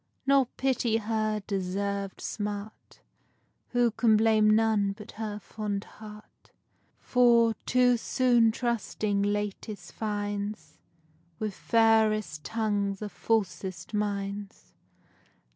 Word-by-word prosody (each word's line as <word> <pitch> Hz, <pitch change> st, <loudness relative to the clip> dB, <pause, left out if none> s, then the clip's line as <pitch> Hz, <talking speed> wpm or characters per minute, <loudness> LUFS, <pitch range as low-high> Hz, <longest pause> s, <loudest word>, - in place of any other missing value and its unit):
Nor 275 Hz, -2 st, +4 dB
pity 255 Hz, -4 st, +1 dB
her 215 Hz, -1 st, -1 dB
deserved 200 Hz, 0 st, -3 dB
smart, 205 Hz, 0 st, -6 dB, 0.7 s
Who 245 Hz, -1 st, +2 dB
can 225 Hz, 0 st, +3 dB
blame 215 Hz, -1 st, +4 dB
none 215 Hz, -2 st, +3 dB
but 210 Hz, 0 st, -11 dB
her 215 Hz, -1 st, -5 dB
fond 210 Hz, -1 st, -4 dB
heart; 210 Hz, -1 st, -14 dB, 0.5 s
For, 235 Hz, -2 st, +4 dB
too 250 Hz, -1 st, +4 dB
soon 240 Hz, -1 st, +3 dB
tursting 220 Hz, -3 st, -1 dB
latest 205 Hz, +1 st, -3 dB
finds 205 Hz, -1 st, -4 dB, 0.6 s
With 215 Hz, -2 st, -3 dB
fairest 220 Hz, -8 st, +2 dB
tongues 205 Hz, -2 st, -1 dB
are 210 Hz, -, -4 dB
falsest 190 Hz, -3 st, -2 dB
minds. 200 Hz, -1 st, -4 dB
215 Hz, 95 wpm, -28 LUFS, 205-225 Hz, 0.7 s, Nor